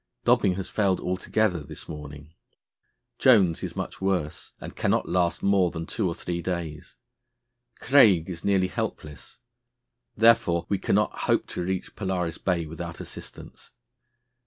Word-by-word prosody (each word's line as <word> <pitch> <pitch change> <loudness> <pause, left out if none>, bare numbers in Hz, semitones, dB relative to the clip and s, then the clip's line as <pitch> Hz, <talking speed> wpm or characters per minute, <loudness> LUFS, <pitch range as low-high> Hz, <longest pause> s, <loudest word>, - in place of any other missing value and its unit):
Dobing 90 - +3
has 95 -1 -4
failed 100 -3 +1
altogether 90 +1 0
this 75 - -10
morning; 75 0 -9 0.9
Jones 100 -10 +4
is - - -5
much - - -5
worse, 90 -6 -2
and - - -9
cannot - - 0
last 90 -1 0
more 100 -2 +3
than 80 -1 -6
two 105 +3 -2
or 85 - -3
three 85 -1 -4
days; 85 -4 -5 0.8
Craig 105 - +5
is 85 -3 -6
nearly 95 -2 +2
helpless; 75 -4 -6 0.8
therefore 110 -7 +4
we 100 - 0
cannot - - 0
hope - - +3
to - - -4
reach 95 +1 -4
Polaris 90 -4 -2
Bay 85 -3 0
without 80 +1 -7
assistance. - - -10
90 Hz, 135 wpm, -26 LUFS, 80-95 Hz, 0.9 s, Craig